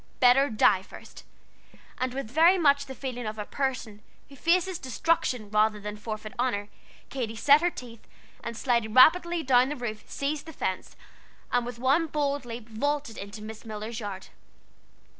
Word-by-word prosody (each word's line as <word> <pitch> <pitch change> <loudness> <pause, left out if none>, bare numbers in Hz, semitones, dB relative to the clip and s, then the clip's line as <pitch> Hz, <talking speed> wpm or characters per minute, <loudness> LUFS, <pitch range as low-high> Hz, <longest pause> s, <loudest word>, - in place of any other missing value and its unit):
Better 260 +3 +5
die 215 -3 +4
first! - - -13 0.8
And 255 0 -2
with 270 -5 -5
very 330 +6 +5
much 285 -4 +3
the 265 - -7
feeling 245 -4 -5
of 215 0 -5
a 210 - -4
person 250 -6 -3 0.3
who 280 - -13
faces 350 +4 +1
destruction 255 -5 -1
rather 215 0 +2
than 210 0 -6
forfeit 215 +1 -6
honor, 210 -5 -1 0.4
Katy 235 -5 -4
set 285 +6 +5
her 350 - +3
teeth, 235 -8 -11 0.4
and 235 - -5
sliding 235 -4 0
rapidly 340 +5 +6
down 255 0 +4
the 295 - -3
roof, 225 -5 -5
seized 290 +3 -3
the 320 - -8
fence, 185 -8 -4 0.6
and 245 -1 +1
with 245 - -6
one 275 +7 +2
bold 285 -3 -1
leap 230 -1 -7
vaulted 280 +2 -2
into 205 +2 -8
Miss 220 0 -9
Miller's 220 +1 -6
yard. 200 -3 -7
245 Hz, 165 wpm, -27 LUFS, 215-285 Hz, 0.8 s, rapidly